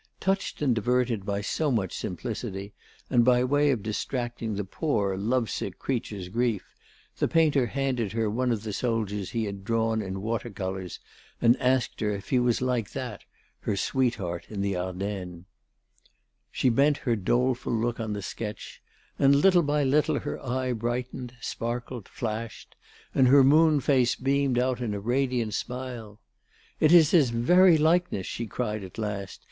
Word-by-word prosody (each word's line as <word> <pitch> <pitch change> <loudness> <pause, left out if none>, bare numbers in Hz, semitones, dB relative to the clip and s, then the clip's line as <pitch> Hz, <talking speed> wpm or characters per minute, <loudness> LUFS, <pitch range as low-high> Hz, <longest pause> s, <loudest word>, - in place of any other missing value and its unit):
Touched 195 -5 -1
and 130 -4 +3
diverted 115 -2 0
by 100 0 -1
so 150 +9 -1
much 100 -7 -1
simplicity, 100 +2 -5 0.4
and 120 - +5
by 125 0 +4
way 145 +3 +3
of 120 -7 0
distracting 115 0 -3
the 105 - -2
poor, 100 - -1
lovesick 110 -2 -1
creature's 105 -7 -3
grief, 115 0 -1 0.5
the - - +2
painter 150 -6 +3
handed 125 -5 -1
her 115 -1 0
one 125 +4 0
of 110 -3 -2
the 110 -2 -4
soldiers 105 -4 -2
he 115 -1 -2
had 100 -1 -6
drawn 115 +1 0
in 95 -1 -5
water 115 +1 -2
colours 95 -3 -5 0.4
and 120 0 +5
asked 130 -1 +1
her 105 - +1
if 100 -1 -5
he 130 - +3
was 125 0 +1
like 125 -5 -1
that, 125 -6 -6 0.3
her - - -2
sweetheart 95 -9 -1
in 105 -2 -4
the 100 -1 0
Ardennes. 90 -1 -4 1.1
She 130 - +2
bent 140 +5 +3
her 120 -3 +2
doleful 120 +5 0
look 115 +1 -1
on 110 -2 -2
the 100 -1 -5
sketch, 105 +2 -6 0.4
and 140 0 +5
little 175 +4 +5
by 150 -1 +1
little 145 +3 +2
her - - -5
eye 130 0 -1
brightened, 125 +2 -4
sparkled, 120 -1 -4
flashed, 115 0 -5 0.4
and 130 - +4
her 135 +2 +7
moon 155 +2 +5
face 130 -2 +2
beamed 135 -1 +1
out 125 0 0
in 110 -4 -2
a - - -3
radiant 120 0 0
smile. 125 -4 -5 0.6
"It 155 - +4
is 165 -3 +7
his 150 -8 +5
very 170 +10 +5
likeness," 160 - +2
she 115 - -4
cried 110 -2 -3
at 95 - -10
last. 100 -3 -4
120 Hz, 165 wpm, -27 LUFS, 105-130 Hz, 1.1 s, her